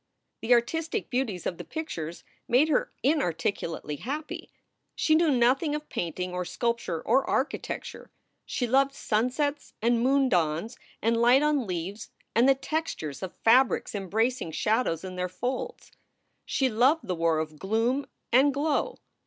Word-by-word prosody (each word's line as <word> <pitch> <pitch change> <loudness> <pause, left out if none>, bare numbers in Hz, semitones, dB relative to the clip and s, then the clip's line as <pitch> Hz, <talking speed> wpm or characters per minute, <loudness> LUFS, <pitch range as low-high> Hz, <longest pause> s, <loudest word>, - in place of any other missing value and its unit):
The 245 +2 +5
artistic 325 - -1
beauties 240 -9 -1
of 175 - -3
the - - -5
pictures 175 - -5 0.2
made 265 +6 +4
her 295 - +1
inarticu 200 - 0
lately 150 -2 -5
happy. 295 - -5 0.5
She 310 - +2
knew 325 0 +4
nothing 270 +4 +3
of 300 0 -6
painting 180 +2 -3
or 180 0 -2
sculpture 235 -5 -2
or 270 - +3
architecture. 270 +3 -3 0.3
She 250 - -2
loved 275 +3 +2
sunsets 265 +7 -1
and 235 +1 +2
moon 270 +2 +3
dawns 175 +3 0 0.3
and 230 +1 +2
light 250 +4 +6
on 295 -6 +1
leaves 185 +4 -4 0.2
and 240 +4 +5
the 270 - +6
textures 275 - -3
of 190 -2 -6
fabrics 250 +3 +4
embracing 215 0 -1
shad 220 +8 +1
ows 165 +1 -2
in 185 -1 -7
their 180 0 -1
folds. 255 - -4 0.6
She 265 - +1
loved 260 +7 +3
the 185 - 0
war 165 -1 +1
of 155 -1 -4
gloom 230 +7 0 0.3
and 270 +3 +6
glow. 300 - 0
240 Hz, 155 wpm, -27 LUFS, 185-275 Hz, 0.6 s, light